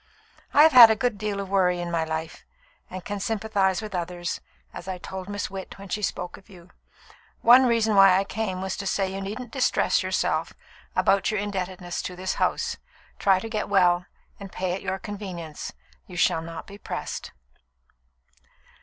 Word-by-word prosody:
"I 295 - +7
have 320 - +7
had 245 -4 +11
a 220 - +3
good 230 -3 -1
deal 210 -1 -2
of 200 - -4
worry 180 -2 +2
in 175 0 -4
my 165 -1 +1
life, 160 0 -5 0.5
and 185 -2 -8
can 205 -1 -4
sympathise 205 -2 0
with 215 - -7
others, 175 -1 -3 0.3
as - - -9
I 185 -1 -3
told 190 +2 -7
Miss 205 -2 -4
Witt 190 -1 -7
when 195 0 -11
she 210 - -2
spoke 180 -3 -3
of 195 - -20
you. 180 -2 -15 0.7
One 250 +2 +7
reason 225 -2 +2
why 195 -2 +7
I 195 - +2
came 195 -3 -3
was 190 -1 -2
to 195 - -4
say 190 0 0
that - - -7
you 195 - -4
needn't 215 +5 -6
distress 265 - +2
yourself - - -1 0.4
about 195 0 +3
your 215 - 0
indebtedness 185 -3 -4
to 180 - -6
this 185 +1 -2
house. - - 0 0.4
Try 195 -2 +4
to 225 - -5
get 215 -3 -3
well, 180 -2 +3 0.3
and 195 -2 -9
pay 185 -1 -2
at 190 - -4
your 190 0 -2
convenience. 185 -6 -7 0.4
You 180 - -9
shall 165 - +3
not 165 0 -8
be 200 0 -12
pressed." - - -5
195 Hz, 190 wpm, -25 LUFS, 180-205 Hz, 0.7 s, had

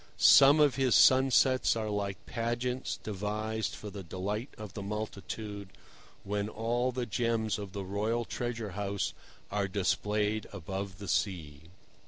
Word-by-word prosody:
Some 95 - +8
of 145 -4 +4
his 130 -2 +3
sunsets 130 -1 +5
are 110 -1 -2
like 100 -2 -3
pageants 120 +2 -2
devised 110 +2 -3
for 105 - -8
the 100 - -7
delight 100 - -4
of 105 -3 -8
the 100 - -6
multitude, 105 0 -5 0.5
when 100 +1 -2
all 120 +3 0
the 125 0 -3
gems 110 -2 0
of 100 -2 -7
the 100 -1 -4
royal 110 +5 -1
treasure 115 -4 -4
house 100 0 -2 0.4
are 100 -1 0
displayed 105 +2 0
above 95 0 -5
the 100 -1 -8
sea. 80 -8 -2
105 Hz, 140 wpm, -31 LUFS, 100-115 Hz, 0.5 s, Some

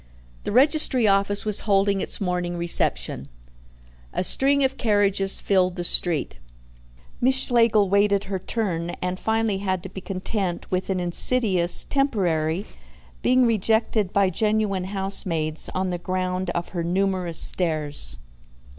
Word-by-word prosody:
The - - -3
registry 265 0 +3
office 200 +1 +2
was 210 -1 +5
holding 195 0 +2
its - - -2
morning 180 -2 -2
reception. 65 - +1 0.8
A - - -1
string 275 +7 +2
of 265 0 0
carriages 200 -4 +1
filled 185 -2 +1
the 175 - -4
street. 165 - +2 0.8
Miss 260 +2 +3
Schlegel 230 -5 +2
waited 200 +1 +2
her 195 -1 -4
turn, 175 -5 -3
and 180 0 -4
finally 220 -3 -1
had 185 -2 -2
to 190 - -8
be 190 +1 -9
content 185 -1 -4
with 185 +1 -2
an 190 -1 -1
insidious 180 0 +2
"temporary," 185 - -1 0.6
being 255 0 +3
rejected 220 -2 0
by 200 -2 +2
genuine 210 -1 -1
housemaids 185 -5 -3
on 185 0 -1
the 175 - -4
ground 185 0 -3
of 170 - -3
her 175 -2 -4
numerous 185 -1 -1
stairs. 150 - 0
190 Hz, 135 wpm, -23 LUFS, 175-210 Hz, 0.8 s, was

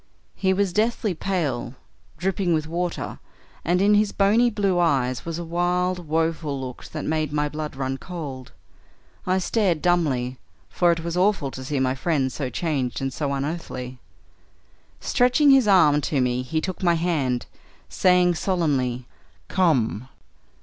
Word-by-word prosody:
He 190 -1 0
was 190 -1 +1
deathly 215 0 +1
pale, 160 -9 -2 0.4
dripping 185 0 0
with 155 -1 -1
water, 170 +2 -3 0.4
and 175 +2 +1
in 205 +1 +5
his 210 0 +3
bonny 215 +5 +3
blue 200 -5 0
eyes 130 -7 +1
was 165 -1 -3
a 170 - -4
wild, 180 +1 -1
woeful 160 -2 -1
look 130 -2 -7
that 155 - -6
made 155 -1 -1
my 150 0 0
blood 150 -1 -5
run 135 0 -3
cold. 140 -8 -7 0.8
I 185 +1 +2
stared 190 -3 +1
dumbly, 140 -8 0 0.3
for 175 -1 +3
it 165 -1 -1
was 170 0 -3
awful 180 -7 +1
to 130 - -7
see 140 +1 -2
my 130 -1 +1
friend 135 -2 0
so 135 -4 -3
changed 135 -2 -2
and 135 -1 -3
so 145 -2 -2
unearthly. 135 -3 -4 1.0
Stretching 250 +4 +3
his 265 -5 +5
arm 155 -7 +5
to 145 -1 -1
me 125 0 +1
he 155 +5 -2
took 185 +2 -5
my 175 -2 +3
hand, 150 -8 0 0.4
saying 180 -1 +3
solemnly, 140 -9 0 0.4
'Come!' 130 - +1
165 Hz, 150 wpm, -24 LUFS, 135-180 Hz, 1.0 s, in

